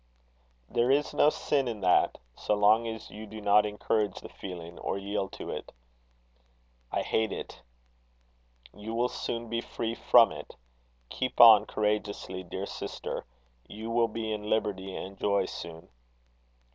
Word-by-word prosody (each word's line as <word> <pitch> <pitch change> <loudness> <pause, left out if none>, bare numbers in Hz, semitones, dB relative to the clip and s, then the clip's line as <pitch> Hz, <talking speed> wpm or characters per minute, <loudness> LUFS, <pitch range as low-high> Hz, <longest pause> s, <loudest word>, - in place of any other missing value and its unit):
"There 120 - +1
is 145 +2 +2
no 150 - +5
sin 140 -3 0
in 110 -4 -4
that, 90 -1 +3 0.2
so 105 - -1
long 105 +3 +4
as 110 -1 -6
you 110 +1 -9
do 110 +1 -8
not 105 0 +4
encourage 105 -1 -1
the - - -10
feeling, 85 -2 -8
or - - -2
yield 100 0 -3
to - - -6
it." - - -6 1.2
"I - - 0
hate 110 -2 0
it." - - -7 1.1
"You 110 +2 -6
will 120 +2 +1
soon 115 -1 -4
be 115 +1 -2
free 115 -1 -4
from 115 -1 +5
it. 75 -1 -9 0.5
Keep 130 - -3
on 110 -3 +9
courageously, 105 -3 -2
dear 95 +3 -5
sister. - - -5 0.4
You 110 +2 -7
will 115 0 +3
be 110 0 -4
in 105 0 -5
liberty 95 -3 -1
and 95 +1 -7
joy 100 -2 +2
soon." 85 -2 -8
105 Hz, 150 wpm, -29 LUFS, 100-115 Hz, 1.2 s, on